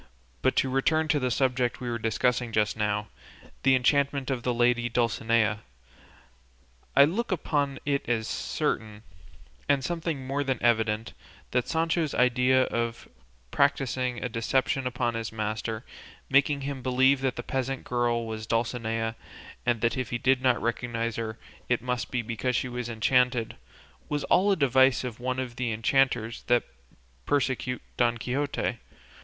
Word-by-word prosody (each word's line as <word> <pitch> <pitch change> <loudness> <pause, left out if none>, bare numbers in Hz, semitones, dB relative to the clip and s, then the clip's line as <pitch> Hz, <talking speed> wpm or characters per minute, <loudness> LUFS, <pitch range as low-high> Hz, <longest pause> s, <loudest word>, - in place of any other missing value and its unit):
But 130 - +2
to - - +2
return 155 +4 +2
to 145 - +3
the 130 -2 0
subject 125 -1 0
we 125 - -5
were 120 -1 -2
discussing 120 +2 0
just 105 -1 +1
now, 105 -1 -1 0.5
the 135 -1 +5
enchantment 140 +1 +1
of 130 -2 -1
the 125 - 0
lady 120 0 +2
Dulcinea, 115 -2 +1 1.4
I 140 - +9
look 205 +10 -2
upon 145 -5 0
it 140 -3 -1
as 110 -2 0
certain, 105 -1 -2 0.7
and 140 -2 +3
something 165 -4 -3
more 140 +2 -1
than 135 -2 -1
evident, 110 -2 +1 0.4
that 125 -1 0
Sancho's 165 -1 0
idea 125 +1 +4
of 115 -2 -3 0.4
practising 130 -3 +1
a - - 0
deception 125 +3 0
upon 125 -1 -1
his 115 -1 -4
master, 110 +1 -3 0.5
making 140 +1 +3
him 135 -1 -4
believe 130 +2 +3
that 130 -2 0
the - - -5
peasant 135 0 -2
girl 120 -1 0
was 110 -1 -6
Dulcinea 115 -1 -1 0.5
and 120 -3 +2
that 115 +1 +1
if 130 -2 -2
he 120 - -1
did 130 +1 +2
not 125 -2 +3
recognise 115 0 -2
her 110 -1 -4 0.3
it 125 - +2
must 125 0 -3
be 125 -2 -1
because 115 +3 -2
she 130 - 0
was 125 -1 -4
enchanted, 125 +1 +1 0.5
was 145 -1 -1
all 200 +3 +3
a - - +4
device 130 -4 +4
of 125 -2 -5
one 130 +1 -2
of 130 -2 -4
the 125 -2 -1
enchanters 115 0 +1
that 120 0 +4 0.6
persecute 130 -2 0
Don 120 -1 +2
Quixote. 125 -1 -2
125 Hz, 155 wpm, -27 LUFS, 115-135 Hz, 1.4 s, I